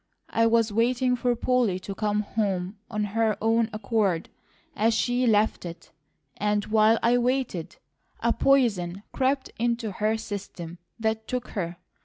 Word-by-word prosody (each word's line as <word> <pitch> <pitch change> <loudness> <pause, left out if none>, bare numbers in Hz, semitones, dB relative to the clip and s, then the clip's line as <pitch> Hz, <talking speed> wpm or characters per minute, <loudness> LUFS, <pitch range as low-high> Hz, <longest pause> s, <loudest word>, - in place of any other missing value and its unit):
I 230 0 +3
was 230 -1 +3
waiting 250 +3 +2
for 245 0 +1
Polly 240 -6 +1
to 195 - -5
come 210 0 0
home 200 -2 -2
of 210 -2 -1
her 220 +1 0
own 225 +1 +2
accord, 205 -5 0 0.5
as 220 +2 +2
she 245 +2 +1
left 215 -1 +2
it; 170 -1 -9 0.5
and 210 0 0
while 220 +1 +4
I 240 +1 +4
waited, 245 -9 -1 0.4
a 235 0 +2
poison 200 -9 +2
crept 265 0 0
into 235 -2 0
her 215 +3 0
system 190 -5 -7 0.2
that 220 0 -1
took 250 -1 -3
her. 175 -3 -4
220 Hz, 145 wpm, -26 LUFS, 205-235 Hz, 0.5 s, while